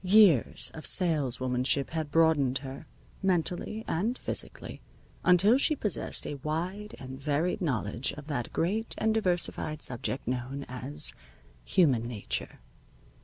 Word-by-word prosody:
Years 190 Hz, -, +5 dB
of 155 Hz, -, -9 dB
saleswomanship 135 Hz, -5 st, +1 dB
had 160 Hz, -2 st, -3 dB
broadened 150 Hz, -5 st, +3 dB
her, 135 Hz, +4 st, -8 dB, 0.3 s
mentally 190 Hz, +4 st, -1 dB
and 220 Hz, +10 st, -1 dB
physically, -, -, -1 dB, 0.4 s
until 195 Hz, +8 st, +5 dB
she 305 Hz, +2 st, +3 dB
possessed 210 Hz, -, +1 dB
a 145 Hz, -, -5 dB
wide 180 Hz, +8 st, -4 dB
and 130 Hz, +1 st, -9 dB
varied 155 Hz, +7 st, 0 dB
knowledge 125 Hz, -, -1 dB
of 150 Hz, -, -10 dB
that 140 Hz, -6 st, -4 dB
great 210 Hz, +7 st, -1 dB
and 220 Hz, -, +1 dB
diversified 175 Hz, -6 st, 0 dB
subject 125 Hz, +1 st, -3 dB
known 130 Hz, +3 st, -3 dB
as 75 Hz, -, +1 dB, 0.5 s
human 135 Hz, -, +2 dB
nature. 100 Hz, -, -4 dB
155 Hz, 120 wpm, -29 LUFS, 130-185 Hz, 0.5 s, Years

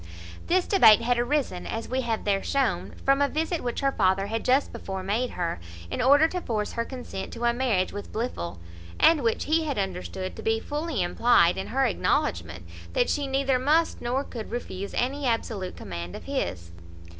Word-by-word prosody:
This 360 Hz, +1 st, +3 dB
debate 220 Hz, -, +7 dB
had 240 Hz, +1 st, +1 dB
arisen, 245 Hz, -7 st, -1 dB
as 225 Hz, 0 st, -4 dB
we 260 Hz, +1 st, -1 dB
have 230 Hz, -3 st, -2 dB
there 200 Hz, -1 st, +1 dB
shown, 275 Hz, -4 st, -1 dB
from 275 Hz, +1 st, +4 dB
a 285 Hz, -, +3 dB
visit 320 Hz, +3 st, -1 dB
which 240 Hz, -1 st, -3 dB
her 275 Hz, 0 st, +2 dB
father 195 Hz, -4 st, +2 dB
had 225 Hz, +2 st, -3 dB
just 265 Hz, +3 st, +2 dB
before 190 Hz, -1 st, -5 dB
made 220 Hz, +6 st, 0 dB
her, 170 Hz, -, -2 dB, 0.3 s
in -, -, -1 dB
order 285 Hz, +5 st, +6 dB
to 360 Hz, +1 st, -3 dB
force 215 Hz, -7 st, -2 dB
her 230 Hz, -, -1 dB
consent 245 Hz, -6 st, -7 dB
to 235 Hz, -, -6 dB
a 235 Hz, -, +3 dB
marriage 235 Hz, -7 st, 0 dB
with 205 Hz, 0 st, -7 dB
Blifil; 90 Hz, -, -4 dB, 0.4 s
and 325 Hz, -3 st, +5 dB
which 230 Hz, -2 st, 0 dB
he 320 Hz, +1 st, +2 dB
had 285 Hz, -4 st, -2 dB
understood 185 Hz, -1 st, -4 dB
to -, -, -8 dB
be 225 Hz, 0 st, +1 dB
fully 295 Hz, -, -2 dB
implied 175 Hz, -1 st, +4 dB
in 190 Hz, -, -4 dB
her 265 Hz, +2 st, +1 dB
acknowledgment 85 Hz, -, 0 dB, 0.3 s
"that -, -, +2 dB
she 285 Hz, -1 st, -1 dB
neither 270 Hz, -1 st, +1 dB
must 310 Hz, +5 st, +2 dB
nor 250 Hz, +3 st, -1 dB
could 230 Hz, -5 st, -7 dB
refuse 200 Hz, -4 st, -5 dB
any 270 Hz, +2 st, 0 dB
absolute 220 Hz, -5 st, -2 dB
command 85 Hz, -2 st, -6 dB
of -, -, -8 dB
his." 85 Hz, -1 st, -3 dB
235 Hz, 190 wpm, -26 LUFS, 195-275 Hz, 0.4 s, debate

